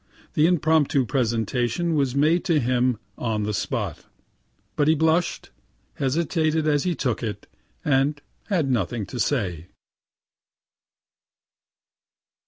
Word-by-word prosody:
The 155 +1 +4
impromptu 155 -5 +2
presentation 120 - 0
was 140 -4 +1
made 155 +5 +3
to 165 -5 +3
him 125 -1 +1 0.2
on 110 -3 -1
the 105 +1 -2
spot, 100 - -3 0.7
but 145 - +2
he 160 - +5
blush'd, 160 +3 +1 0.4
hesitated 155 +2 0
as 145 0 +2
he 180 -2 0
took 125 -4 -1
it, 105 -3 -4 0.4
and 145 +1 +2 0.3
had 165 -10 +1
nothing 110 -1 -1
to 120 +6 -7
say. 90 - -1
140 Hz, 110 wpm, -24 LUFS, 120-160 Hz, 0.7 s, he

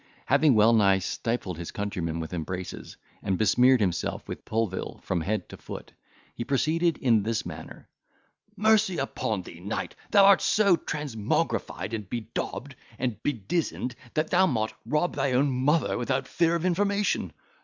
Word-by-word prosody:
Having 150 -6 +4
well 110 +2 +6
nigh 100 -4 +5
stifled 95 -2 -3
his 85 - -5
countryman 90 -6 -3
with 80 +2 -5
embraces, 90 +2 -5 0.2
and 95 -1 -1
besmeared 125 +5 +4
himself 90 -6 -1
with - - -7
pulville 110 -4 -2
from 90 -3 -1
head 105 +6 -2
to - - -9
foot, - - -9 0.4
he 120 - -4
proceeded 160 +6 +1
in 115 -5 +3
this 110 +2 -2
manner, - - -9 0.7
"Mercy 215 -3 +3
upon 110 -7 -2
thee, 85 - -11
knight, 100 +5 -4
thou 200 -2 +6
art 200 -1 +7
so 200 -4 +4
transmographied, 115 - -2
and 105 -4 -4
bedaubed, 120 +4 -4 0.2
and 120 -5 -2
bedizened, 130 - -2 0.2
that 155 0 0
thou 185 +1 +5
mought 110 -7 -1
rob 150 +7 +1
thy 135 - 0
own 135 +2 +3
mother 140 +5 +1
without 130 +2 -1
fear 170 -1 +2
of 170 +1 -2
information. 200 +3 +1
120 Hz, 155 wpm, -27 LUFS, 100-160 Hz, 0.7 s, art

